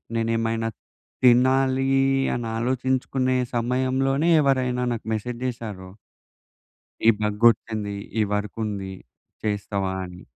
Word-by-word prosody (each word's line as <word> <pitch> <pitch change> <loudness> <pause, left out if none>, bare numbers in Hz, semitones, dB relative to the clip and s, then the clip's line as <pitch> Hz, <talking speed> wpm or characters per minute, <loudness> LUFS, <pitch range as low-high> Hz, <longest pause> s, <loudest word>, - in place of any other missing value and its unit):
నేనేమైనా 115 0 0 0.5
తినాలీ 130 +2 +4 0.4
అని 120 -1 -3
ఆలోచించుకునే 130 +1 0 0.2
సమయంలోనే 130 +5 +1
ఎవరైనా 130 -3 +1
నాకు 115 - -6
మెసేజ్ 120 +3 -3
చేసారో 105 -7 -5 1.2
"ఈ - - +10
బగొచ్చింది. 105 -1 +2 0.2
ఈ - - +4
వర్క్ 105 +1 -3
ఉంది, 95 -2 -4 0.5
చేస్తావా" 100 -2 -2
అని. 90 0 -11
115 Hz, 95 wpm, -24 LUFS, 105-130 Hz, 1.2 s, ఈ